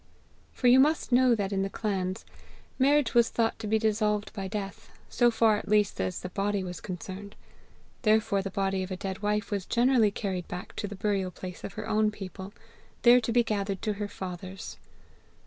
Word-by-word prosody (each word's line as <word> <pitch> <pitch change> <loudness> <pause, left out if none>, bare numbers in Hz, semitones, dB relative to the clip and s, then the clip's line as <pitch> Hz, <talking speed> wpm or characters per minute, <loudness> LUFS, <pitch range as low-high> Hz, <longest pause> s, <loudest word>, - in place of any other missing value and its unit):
For - - -6
you 245 +1 +7
must 300 +1 +2
know 250 -1 +5
that 200 -2 -2
in 195 - +1
the 195 - -1
clans, 190 -3 -3 0.5
marriage 280 0 +3
was 235 -1 +5
thought 225 -1 0
to 220 - -5
be 220 +1 +3
dissolved 210 -1 0
by 195 -3 -4
death, 195 -1 -6 0.2
so 240 -1 +4
far 225 -2 +3
at - - -7
least 210 - +2
as 95 -1 -2
the 180 - -5
body 200 0 -1
was 180 -1 -6
concerned; 190 +2 -7 0.7
therefore 215 -3 +3
the 195 - -4
body 195 -1 -1
of 185 - -4
a 185 - -4
dead 190 0 -4
wife 210 +1 -1
was 200 -2 -1
generally 240 -2 +4
carried 190 -3 -4
back 180 0 -7
to 205 - -2
the 205 - -7
burial 195 -1 0
place 180 0 -9
of 195 - -6
her - - -6
own 215 0 +2
people, 195 -1 -8 0.5
there 245 +1 +7
to 230 - -2
be 240 +1 +4
gathered 200 -3 -2
to 215 - 0
her 205 - -1
fathers. 185 0 -7
205 Hz, 200 wpm, -28 LUFS, 190-225 Hz, 0.7 s, you